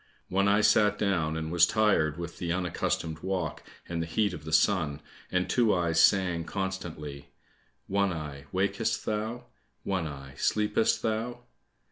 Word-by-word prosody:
One 100 +2 +2
eye 100 +1 +4
sat 105 -1 +4
down 85 -6 0
and 80 0 -4
was 85 0 +5
tired 95 -9 +2
with 85 -1 -7
the 85 -1 -2
unaccustomed 85 -2 -1
walk 90 -3 -3 0.3
and 85 -1 -2
the 80 - -3
heat 100 +3 +1
of 75 -3 -8
the 80 - -6
sun, 80 -2 +2 0.3
and 90 0 +1
Two 115 -5 +3
eyes 85 -2 +1
sang 90 -4 +3
constantly, 80 -7 -5 0.6
"One 100 0 +1
eye, 75 -4 -6
wakest 100 +4 0
thou? 110 +3 -3 0.4
One 95 -4 -1
eye, 70 -2 -9
sleepest 105 +1 +1
thou?" 115 +2 -2
90 Hz, 150 wpm, -29 LUFS, 80-100 Hz, 0.6 s, was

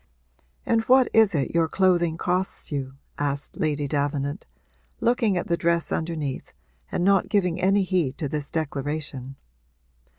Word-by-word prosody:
'And 230 -1 +2
what 260 0 +5
is 220 -5 +5
it 140 - -1
your 165 -1 +3
clothing 175 -2 +2
costs 180 +1 -2
you?' 135 -2 -3 0.2
asked 145 0 -2
Lady 150 -2 0
Davenant, 145 +2 -2 0.5
looking 230 -5 +2
at 175 - -1
the 170 - +1
dress 170 0 0
underneath 160 -4 -3 0.4
and - - -1
not 195 -1 +3
giving 180 -5 +1
any 195 +1 +3
heed 175 -8 0
to 145 - -2
this 145 0 -4
declaration. 145 -3 -4
165 Hz, 140 wpm, -25 LUFS, 145-185 Hz, 0.5 s, what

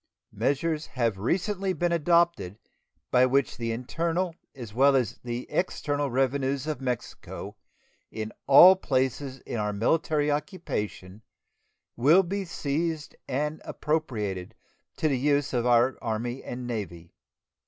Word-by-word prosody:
Measures 155 +3 -1
have 115 -6 -1
recently 190 - 0
been 175 -1 0
adopted 170 - +2 0.5
by 125 - +5
which 130 +1 +2
the 115 -1 -2
internal 165 +9 -2 0.2
as 120 -6 -9
well 135 +3 +5
as 125 -6 0
the 120 0 -4
external 145 -5 -1
revenues 135 +1 0
of 155 -4 -3
Mexico 125 -3 -5 0.5
in 110 0 -5 0.2
all 175 +7 +9
places 130 -4 -1
in 115 - -5
our 105 0 0
military 150 +7 +1
occupation 135 - -4 0.7
will 155 +10 +5
be 195 +3 -3
seized 160 -1 -3
and 150 +4 -2
appropriated 110 - -3 0.4
to 160 - +1
the 135 -4 0
use 145 0 +1
of 120 -1 +1
our 120 +2 +4
Army 120 +3 -3
and 125 0 -6
Navy. 90 -8 -6
135 Hz, 125 wpm, -27 LUFS, 120-155 Hz, 0.7 s, all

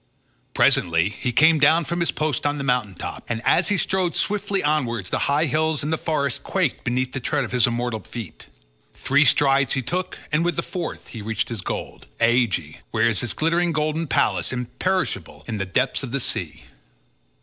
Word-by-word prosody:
Presently 85 0 +3
he 125 +4 -3
came 155 +4 +5
down 155 +3 +4
from 170 +5 -2
his 170 - 0
post 155 -2 -1
on 145 0 -1
the 140 - -3
mountain 125 -7 0
top, - - -6
and 115 -2 -1
as - - +4
he 205 - +1
strode 185 -2 0
swiftly 200 -1 -1
onwards 120 -10 0
the - - 0
high 145 +3 +3
hills 155 +1 0
and 150 +2 -1
the - - +3
forest 140 -5 -1
quaked 185 -8 -1
beneath 125 +1 -1
the 135 - -3
tread 145 +3 -1
of 120 - -6
his 125 -1 +4
immortal 120 -1 -2
feet. 110 -2 -9 0.5
Three 145 +2 +3
strides 135 -2 +3
he 135 - -1
took, 180 +9 -3
and 155 +2 +2
with 175 0 0
the 170 - -1
fourth 180 -3 -5
he 115 - -7
reached 110 +1 -2
his 115 -4 -4
goal—Aegae, 115 -12 -1
where 115 0 +2
is 105 - -1
his 120 - -3
glittering 170 +2 +1
golden 155 +1 -1
palace, - - +1
imperishable, 125 - -2
in 110 - -3
the 100 - -2
depths 125 +7 0
of 130 - -5
the 135 +3 -1
sea. - - -2
135 Hz, 195 wpm, -23 LUFS, 115-160 Hz, 0.5 s, came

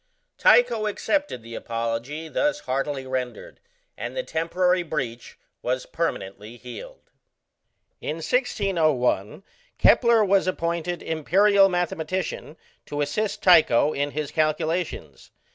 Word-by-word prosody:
Tycho 230 - +4
accepted 290 - -1
the 115 0 -10
apology 115 +8 -4
thus 295 - 0
heartily 135 +1 -2
rendered, 130 -1 -5 0.4
and - - -6
the - - -1
temporary 180 - +1
breach 130 -8 -5 0.2
was 125 +1 -2
permanently 105 - -4
healed. 120 -2 -11 0.9
In 150 - -3
1601, 165 - 0 0.3
Kepler 235 -3 +5
was 195 -1 +2
appointed 170 -1 -2
"Imperial 195 +5 +4
mathematician," 175 -2 -3 0.3
to 145 0 -3
assist 175 +9 -2
Tycho 155 -5 +5
in 145 +1 -1
his 150 -1 -4
calculations. 155 - -2
160 Hz, 105 wpm, -24 LUFS, 130-185 Hz, 0.9 s, Kepler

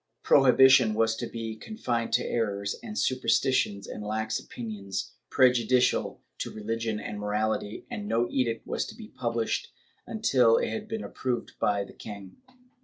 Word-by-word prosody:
Prohibition 130 -4 +6
was 115 0 +2
to 120 - -3
be 115 -1 -5
con 215 - -9
fined 115 - -1
to - - +2
errors 100 -3 -1
and 220 -3 -7
superstitions 130 -5 +1
and 105 - -7
lax 110 +1 -1
opinions 105 -5 -5 0.2
prejudicial 125 -1 +3 0.2
to - - -3
religion 110 0 -3
and 105 0 -6
morality, 105 0 -2
and 215 -4 -5
no 120 - +1
edict 115 -3 0
was - - -1
to - - -9
be - - -11
published 115 -1 -2 0.4
until 130 - +3
it - - 0
had 215 -1 -4
been 220 0 -4
approved 125 -2 -3
by 100 -1 +1
the - - -12
king. 100 -3 -10
115 Hz, 155 wpm, -28 LUFS, 105-130 Hz, 0.4 s, Prohibition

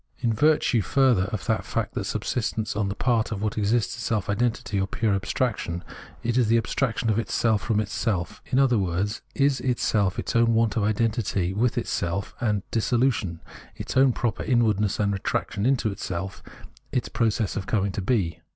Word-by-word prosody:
In 120 -3 0
virtue, 145 -1 +3
further, 125 -4 +3
of 105 -4 -4
the - - +2
fact - - -3
that - - -3
subsistence 110 -2 -2
on 105 -2 0
the 100 - -3
part 115 -3 +1
of 105 - -3
what 105 - -1
exists 110 +2 +1
is - - -6
self 105 -3 -1
identity 110 -2 0
or 95 - 0
pure 110 0 0
abstraction, 95 -3 -1 0.4
it 120 +2 +1
is 120 - +3
the 115 +1 +4
abstraction 115 -1 0
of 110 - +1
itself 115 -2 +1
from 110 -3 0
itself, 100 -4 -2
in 130 - 0
other 130 -4 +4
words, 95 +4 -1
is 140 -1 +2
itself 105 -6 +1
its - - -3
own 115 0 +4
want 115 -2 +2
of 110 - +1
identity 105 -4 0
with 115 +4 +1
itself 90 +3 -2
and 105 -4 0
dissolution 115 -7 +1 0.2
— - - -21
its - - -6
own 130 0 +6
proper 115 -3 -2
inwardness 110 -6 +1
and 100 -1 +1
retraction 100 +2 -1
into 120 -6 +1
self 95 +2 -4 0.2
— - - -23
its 125 - -1
process 110 -3 0
of 95 - -4
coming 100 -3 +1
to 100 - -3
be. 95 -6 0
110 Hz, 190 wpm, -25 LUFS, 100-120 Hz, 0.4 s, own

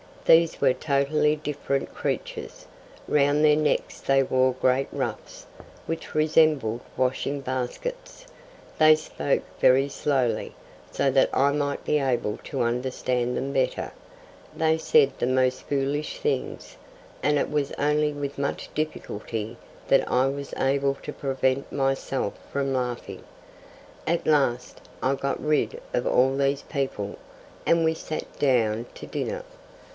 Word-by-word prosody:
These 165 0 +5
were - - +5
totally 150 +2 +1
different 145 -2 -3
creatures. - - -4 0.4
Round 145 +1 +3
their 150 -1 +6
necks 155 -1 0
they 135 0 +3
wore 130 0 +2
great 130 +1 +1
ruffs, - - -5 0.4
which 165 -1 -5
resembled 155 -7 +3 0.2
washing 130 +2 0
baskets. 315 - -5 0.5
They 155 0 +8
spoke 155 -2 -1 0.2
very 135 +2 +5
slowly, 130 -6 -1 0.3
so 140 -1 +1
that 135 0 +4
I 140 +2 +3
might 145 -1 -1
be 150 - +2
able 125 -6 -1
to - - -3
understand 125 0 -1
them 135 +1 -2
better. 135 -2 0 0.6
They 160 0 +2
said 155 -3 +4
the - - +1
most 130 0 +1
foolish 145 +2 -1
things, 445 0 -3 0.4
and 150 0 +2
it - - -1
was 145 -2 0
only 150 +1 +1
with 140 -1 -5
much 140 0 -2
difficulty 115 -7 -4 0.3
that - - +4
I 130 +1 +3
was 140 +1 -4
able 140 +1 +1
to - - -5
prevent 135 -1 -1
myself 135 -4 -1 0.2
from 135 -1 -1
laughing. 125 -2 -3 0.8
At 170 +1 0
last 135 -5 +1 0.2
I 130 - +3
got 140 0 -2
rid 155 - +1
of - - 0
all 130 +2 +3
these 140 0 +1
people, 130 -8 -3 0.5
and 165 0 +4
we 160 0 +3
sat 155 -1 -6
down 115 -4 +2
to - - -8
dinner. - - -3
140 Hz, 135 wpm, -25 LUFS, 130-150 Hz, 0.8 s, They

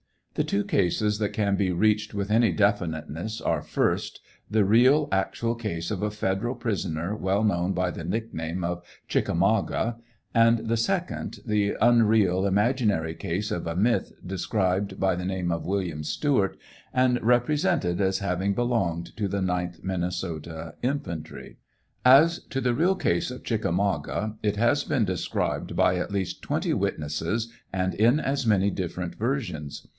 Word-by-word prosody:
The - - 0
two 100 - 0
cases 105 +3 +1
that 105 -2 -1
can 100 -2 +1
be 95 -2 +1
reached 105 +4 +1
with 100 0 -3
any 115 -3 +4
definiteness 90 0 -1
are, - - 0
first, - - -1 0.3
the 110 -1 +3
real 125 +9 +4
actual 95 +4 0
case 105 -8 -4
of 100 - -2
a 105 - 0
federal 105 +3 -1
prisoner 95 -5 -2
well 100 0 0
known 95 -3 +1
by 90 -1 0
the 85 - -7
nickname 90 -4 -3
of 90 +1 -2
" - - -31
Chickamauga;" 115 +1 +1 0.4
and 115 -1 +4
the 115 +1 +1
second, 180 - -2
the 105 -2 +1
unreal, 110 -5 +4
imaginary 105 -5 +1
case 90 +5 -3
of 85 - -3
a 85 - -2
myth 115 +6 +1
described 95 +1 -1
by 95 -2 +2
the 90 +1 -4
name 90 -2 -1
of 85 -1 -2
William 90 -5 -2
Stewart, 100 - 0 0.4
and 125 -1 +3
repre 120 +2 +3
sented 120 - +1
as 95 -1 +1
having 100 +1 -1
belonged 95 -9 -1
to 105 -2 0
the 100 +1 -2
9th 90 -2 -2
Minnesota 85 -3 -4
infantry. 110 - -4 0.5
As 155 +7 +7
to 135 - -3
the 125 -2 +1
real 175 +9 +2
case 85 - 0
of 125 - -8
•' - - -24
Chickamauga," 100 - -1
it 105 -1 0
has 120 +7 +2
been 135 -8 +1
described 95 -3 -2
by 90 - +3
at 90 - -2
least 95 -3 -3
twenty - - -1
witnesses, 80 +10 -2 0.2
and 95 0 0
in 120 +7 +4
as 135 -4 -1
many 100 -2 +3
diffwent 90 -1 -4
versions. 105 - -3
100 Hz, 160 wpm, -26 LUFS, 90-115 Hz, 0.5 s, As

